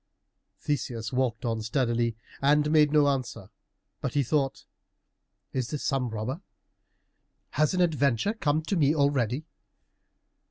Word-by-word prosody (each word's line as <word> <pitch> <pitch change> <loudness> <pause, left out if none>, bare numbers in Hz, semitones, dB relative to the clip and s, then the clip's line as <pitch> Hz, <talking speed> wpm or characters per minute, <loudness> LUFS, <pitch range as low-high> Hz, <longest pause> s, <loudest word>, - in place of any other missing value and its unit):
Theseus 115 -5 -3
walked 125 -1 0
on 115 -1 -1
steadily, 115 0 0 0.3
and 150 +2 +3
made 150 -2 +5
no 150 -1 +4
answer, 135 -4 -2 0.5
but - - -3
he 145 - +3
thought, 135 +1 -1 0.9
"Is 130 -3 -2
this 150 - -4
some 130 -3 0
robber? 115 - -4 1.1
Has 155 +4 +1
an 180 - +2
adventure 145 - +2
come 155 -7 0
to 195 - -1
me 150 -2 +3
already?" 140 -1 +1
140 Hz, 125 wpm, -27 LUFS, 120-150 Hz, 1.1 s, made